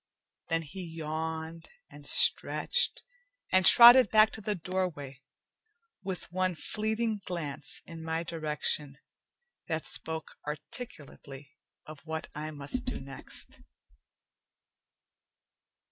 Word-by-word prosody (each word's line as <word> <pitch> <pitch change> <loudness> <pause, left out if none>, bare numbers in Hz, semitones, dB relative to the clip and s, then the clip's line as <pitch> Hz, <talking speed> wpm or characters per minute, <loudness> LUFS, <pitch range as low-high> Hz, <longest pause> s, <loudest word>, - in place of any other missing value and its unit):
Then 165 0 -1
he 185 +6 -9
yawned 160 0 -5 0.2
and - - -8
stretched, 485 0 +4 0.5
and 185 0 +4
trotted 240 +2 +9
back 215 0 +5
to 220 - -7
the 210 0 -2
doorway, 165 -7 -4 0.8
with 190 -3 -6
one 185 0 0
fleeting 215 +8 -2
glance 160 -6 -4
in 165 -1 -10
my 160 +1 -2
direction 150 -3 -1 0.7
that 160 -3 -3
spoke 160 -1 -5
articulately 145 - -9 0.3
of 155 -1 -11
what 160 0 -5
I 155 +1 -5
must 150 - -3
do 255 - -3
next. 135 0 -7
160 Hz, 100 wpm, -30 LUFS, 150-190 Hz, 0.8 s, trotted